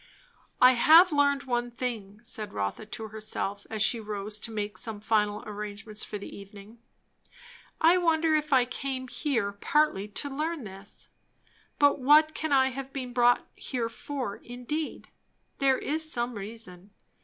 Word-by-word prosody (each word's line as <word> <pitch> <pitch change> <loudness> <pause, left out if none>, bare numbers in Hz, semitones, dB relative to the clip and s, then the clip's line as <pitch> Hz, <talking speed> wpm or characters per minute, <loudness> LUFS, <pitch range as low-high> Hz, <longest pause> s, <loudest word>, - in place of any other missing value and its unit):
I 255 0 +8
have 320 +8 +7
learned 285 -1 +3
one 245 -2 -1
thing, 225 -4 -5
said 220 -3 -3
Rotha 100 - -3
to 220 0 -6
herself, 210 -2 -4
as 215 -2 +1
she 230 +2 +3
rose 210 -1 -5
to 230 - -4
make 205 -3 -4
some 220 -3 -4
final 210 -1 +1
arrangements 210 0 -5
for 210 - -5
the 200 - -9
evening. 200 +3 -12 1.0
I 335 +3 +6
wonder 325 -2 +2
if 305 0 0
I 255 -2 +5
came 260 0 -4
here 240 -7 -1
partly 205 0 +1
to 210 +7 -3
learn 315 0 -2
this? 195 0 -8 0.7
But 285 -1 +4
what 305 +4 +5
can 315 -1 -3
I 265 -1 +5
have 270 +1 -7
been 255 -3 -5
brought 245 0 +4
here 240 -3 -3
for, 250 -3 -5
indeed? 250 +6 -5 0.5
There 270 -2 +4
is 315 +1 0
some 240 +1 -1
reason. 200 -3 -7
240 Hz, 155 wpm, -28 LUFS, 210-280 Hz, 1.0 s, I